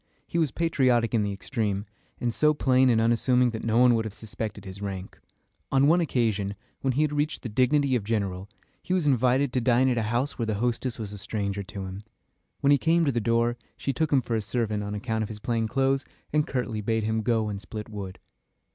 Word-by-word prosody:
He 170 - -2
was 160 -3 +2
patriotic 130 -8 +2
in 115 - +3
the 100 -1 -1
extreme, 100 0 -2 0.3
and 120 -1 -1
so 150 +5 +3
plain 130 -2 +4
and 115 -2 +4
unassuming 120 +2 +3
that 110 - -6
no 115 0 +1
one 125 0 +6
would 115 -1 +1
have 110 -2 -6
suspected 105 -2 -6
his 95 +1 -8
rank. 95 -1 -6 0.5
On 135 0 +4
one 170 +4 +5
occasion, 110 - 0 0.3
when 135 -1 +1
he 145 +5 +2
had 150 -1 0
reached 150 +1 -1
the 120 - -4
dignity 130 +4 +2
of 115 - 0
general, 100 -3 -2 0.3
he 185 - -1
was 180 -4 +1
invited 130 0 +2
to 125 - +1
dine 125 +2 +3
at 120 -2 +1
a 110 -1 -2
house 125 +5 -1
where 115 - -1
the 110 - 0
hostess 120 +2 -1
was 105 -3 -6
a 105 - -7
stranger 100 0 -3
to 95 0 -7
him. 95 +1 -7 0.6
When 140 0 +4
he 140 - +5
came 165 +4 +3
to 140 - +2
the 120 -2 -1
door, 115 +1 +1 0.2
she 135 - -2
took 155 +4 0
him 135 -3 +3
for 115 - -3
a 110 - 0
servant, 105 0 -1
on 105 0 -4
account 110 +1 -2
of 110 - -3
his 110 - -6
plain 115 +1 -1
clothes, 135 +3 +1 0.3
and 150 -1 +2
curtly 120 -4 -2
bade 110 +1 0
him 110 +1 0
go 115 -1 +1
and 100 -1 -4
split 105 0 -7
wood. 100 -4 -7
115 Hz, 230 wpm, -26 LUFS, 105-130 Hz, 0.6 s, one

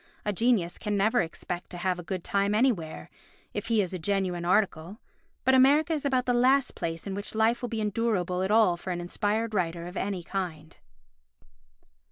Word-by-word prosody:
A 210 - 0
genius 205 -5 +1
can 210 -2 -1
never 220 +5 +3
expect 175 +1 -5
to 180 - -8
have 180 0 -1
a - - -6
good 180 +1 -4
time 200 +1 +1
anywhere, 215 -10 0 0.5
if - - -4
he 225 -2 +3
is 185 - -4
a 185 - -3
genuine 185 -1 -1
article, 185 0 0 0.4
but 260 - +3
America 285 +5 +5
is 295 -2 -3
about 260 -2 +1
the 245 - +2
last 255 +2 +3
place 165 0 -4
in 195 - -4
which 200 +2 -6
life 225 +2 +2
will 245 - -3
be 225 -1 -2
endurable 205 -4 0
at 190 - 0
all 210 -5 +4
for 185 - -8
an 175 -1 -2
inspired 210 +5 -1
writer 170 -3 -1
of 180 +2 -8
any 195 -3 -2
kind. 165 -4 -5
200 Hz, 195 wpm, -28 LUFS, 175-230 Hz, 0.5 s, America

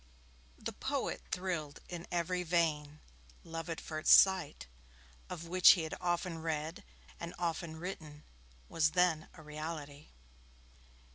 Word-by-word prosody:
The - - -5
poet - - -2
thrilled 170 -6 -3
in 175 -1 -7
every 175 +1 0
vein. 155 -4 0 0.4
'Love 165 0 -6
at 165 - -3
first 155 0 0
sight', 185 - +6 0.6
of 170 - -6
which 180 +1 +8
he 175 - -2
had 160 - -5
often 175 -1 -1
read 160 +1 -3 0.4
and 170 0 -6
often 165 -1 -2
written, 160 -3 -7 0.4
was 155 -1 +2
then 175 -3 +3
a 160 - -12
reality! 150 -1 -6
165 Hz, 125 wpm, -34 LUFS, 155-175 Hz, 0.6 s, which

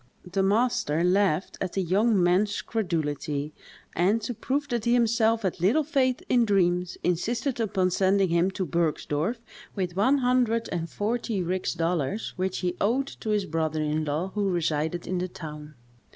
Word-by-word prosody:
The 185 +2 -1
master 195 -6 +1
laughed 185 -1 +1
at 185 -2 -2
the 195 - 0
young 200 +2 +2
man's 195 +4 +2
credulity, 150 -7 -2 0.4
and, 195 +6 +3
to 245 - -3
prove 280 +6 -2
that 240 -2 -2
he 235 - +3
himself 230 -1 +2
had 185 -3 -2
little 235 - +3
faith 265 -4 +1
in 245 -1 +4
dreams, 180 -4 +1
insisted 230 - -1
upon 190 -4 +1
sending 190 +1 +2
him 170 +2 +2
to 190 -1 -3
Bergsdorff 165 - -1 0.4
with 180 -3 -2
one 260 +9 +3
hundred 245 -3 +1
and 170 -1 -3
forty 215 -1 -2
rix 180 +2 -2
dollars, 170 +4 -1
which 185 0 -2
he 180 -1 -1
owed 250 +7 +2
to 220 - -5
his 210 -2 +1
brother 160 -2 -1
in 155 +1 0
law, 155 +6 -1
who 205 -2 0
resided 160 -1 -1
in 185 -1 -2
the 180 - -1
town. 150 -3 -9
190 Hz, 165 wpm, -26 LUFS, 170-225 Hz, 0.4 s, in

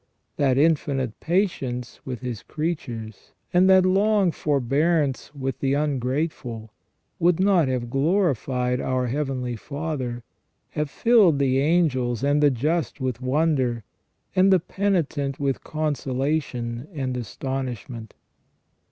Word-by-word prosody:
That 135 -3 +2
infinite 140 -5 +1
patience 140 - -1
with 125 -2 -5
His 125 -4 -4
creatures, 120 - -5 0.2
and 180 +2 +5
that 190 -1 +6
long 195 0 +3
forbearance 145 +1 0
with 135 -2 -3
the 135 0 +1
ungrateful, 130 -5 -2 0.5
would 175 0 +3
not 190 -6 +4
have 125 -2 -2
glorified 135 - +1
our 130 -1 0
Heavenly 130 -2 -2
Father, 135 -2 -4 0.5
have 150 -1 -2
filled 215 - +4
the 135 -1 +2
angels 135 -6 +1
and 145 +1 +2
the 145 - +6
just 150 +6 -1
with 130 -2 -3
wonder, 130 -4 +1 0.5
and 190 +1 +5
the 190 - +6
penitent 165 -7 -1
with 140 -2 -1
consolation 135 -4 -2
and 130 -3 -2
astonishment. 125 -2 -5
140 Hz, 115 wpm, -24 LUFS, 125-160 Hz, 0.5 s, that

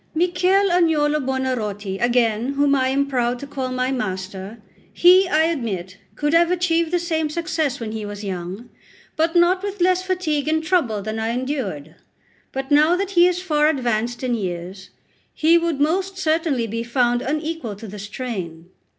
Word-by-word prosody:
Michel 365 +3 +2
Agnolo 310 -4 +2
Buonarroti, 220 -7 -2
again, 240 +1 +1
whom 285 0 +2
I 260 -2 +2
am 275 +2 +1
proud 250 -3 0
to 280 - -8
call 270 -2 -4
my 255 +1 -1
master; 195 -2 -4 0.3
he, 365 +2 +6
I 315 -2 +3
admit, 215 - -3 0.2
could 295 +1 -1
have 335 0 +5
achieved 335 -2 +1
the 355 - +1
same 320 -3 -1
success 320 -4 -2
when 225 -2 -5
he 220 -1 -5
was 205 0 -7
young, 190 +4 -6 0.4
but 325 +1 0
not 350 +2 +4
with 405 0 -5
less 365 +1 +3
fatigue 360 -6 -1
and 315 +1 +1
trouble 275 - 0
than 215 +1 -4
I 220 0 -1
endured. 245 - -4 0.5
But 270 +1 -5
now 305 +4 +5
that 390 +1 -2
he 350 -2 +5
is 360 0 -1
far 300 -4 +2
advanced 240 -4 -1
in 250 -1 0
years, 185 -2 -5 0.5
he 330 +2 +4
would 335 -4 -2
most 375 +6 0
certainly 315 -7 0
be 230 +1 -3
found 240 0 +1
unequal 305 -4 -3
to 220 +3 -10
the 210 +1 -8
strain. 190 -6 -6
275 Hz, 170 wpm, -21 LUFS, 225-330 Hz, 0.5 s, he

